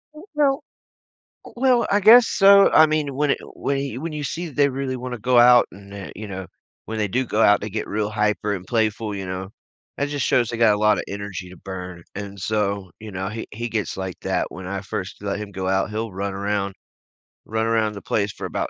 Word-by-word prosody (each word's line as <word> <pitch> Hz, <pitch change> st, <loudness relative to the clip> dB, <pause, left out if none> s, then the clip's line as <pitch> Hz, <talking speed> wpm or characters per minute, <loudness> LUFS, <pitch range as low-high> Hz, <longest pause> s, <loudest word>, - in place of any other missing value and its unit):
I -, -, -10 dB, 0.2 s
don't 280 Hz, 0 st, +2 dB, 0.8 s
uh, -, -, -11 dB
well, 250 Hz, -2 st, +3 dB
I 205 Hz, -, +3 dB
guess 225 Hz, +4 st, +8 dB
so. 200 Hz, 0 st, +6 dB
I 155 Hz, -, +8 dB
mean, 150 Hz, -3 st, -1 dB
when 145 Hz, 0 st, +1 dB
it -, -, +1 dB, 0.2 s
when 140 Hz, -, -1 dB
he 135 Hz, -3 st, -3 dB
when 160 Hz, +2 st, -5 dB
you 150 Hz, -1 st, -4 dB
see 170 Hz, +5 st, -3 dB
that 145 Hz, -, -13 dB
they 145 Hz, -1 st, +4 dB
really 135 Hz, -1 st, -3 dB
wanna 125 Hz, -1 st, -5 dB
go 125 Hz, +2 st, +3 dB
out 120 Hz, 0 st, +7 dB
and, 100 Hz, +1 st, -13 dB
uh, 100 Hz, -1 st, -7 dB
you 110 Hz, -1 st, -7 dB
know, 95 Hz, -1 st, -6 dB, 0.4 s
when 110 Hz, 0 st, -4 dB
they 105 Hz, -1 st, 0 dB
do 130 Hz, +7 st, 0 dB
go 110 Hz, -, -1 dB
out, 105 Hz, -1 st, +5 dB
they 105 Hz, -, -5 dB
get 110 Hz, +2 st, -3 dB
real 105 Hz, 0 st, -1 dB
hyper 105 Hz, -1 st, 0 dB
and 90 Hz, -2 st, -7 dB
playful, 110 Hz, -2 st, 0 dB
you 95 Hz, -1 st, -5 dB
know. 95 Hz, +1 st, -5 dB, 0.5 s
That 140 Hz, -, -1 dB
just 145 Hz, -2 st, -1 dB
shows 120 Hz, -3 st, +2 dB
they 120 Hz, -, -3 dB
got 115 Hz, -2 st, +5 dB
a 105 Hz, -, -2 dB
lotta 105 Hz, 0 st, +3 dB
energy 100 Hz, -2 st, -6 dB
to 90 Hz, -, -12 dB
burn. 90 Hz, -2 st, -8 dB
And 100 Hz, 0 st, -7 dB
so, 100 Hz, -2 st, -1 dB
you 110 Hz, -1 st, -8 dB
know, 95 Hz, +1 st, -3 dB
he 110 Hz, +2 st, -6 dB
he 120 Hz, +3 st, -4 dB
gets 110 Hz, -3 st, -2 dB
like 95 Hz, -1 st, -5 dB
that. -, -, -1 dB
When 90 Hz, 0 st, -8 dB
I 100 Hz, +1 st, -3 dB
first 95 Hz, 0 st, -6 dB
let 100 Hz, -1 st, -2 dB
him 105 Hz, -1 st, -7 dB
go 95 Hz, -1 st, -3 dB
out, 95 Hz, +2 st, +1 dB
he'll 110 Hz, 0 st, -3 dB
run 100 Hz, +1 st, -3 dB
around, 100 Hz, 0 st, -2 dB, 0.7 s
run 110 Hz, +1 st, -1 dB
around 110 Hz, -2 st, +1 dB
the 100 Hz, -, -8 dB
place 100 Hz, +1 st, -1 dB
for -, -, -7 dB
about -, -, -3 dB
105 Hz, 240 wpm, -22 LUFS, 100-130 Hz, 0.8 s, guess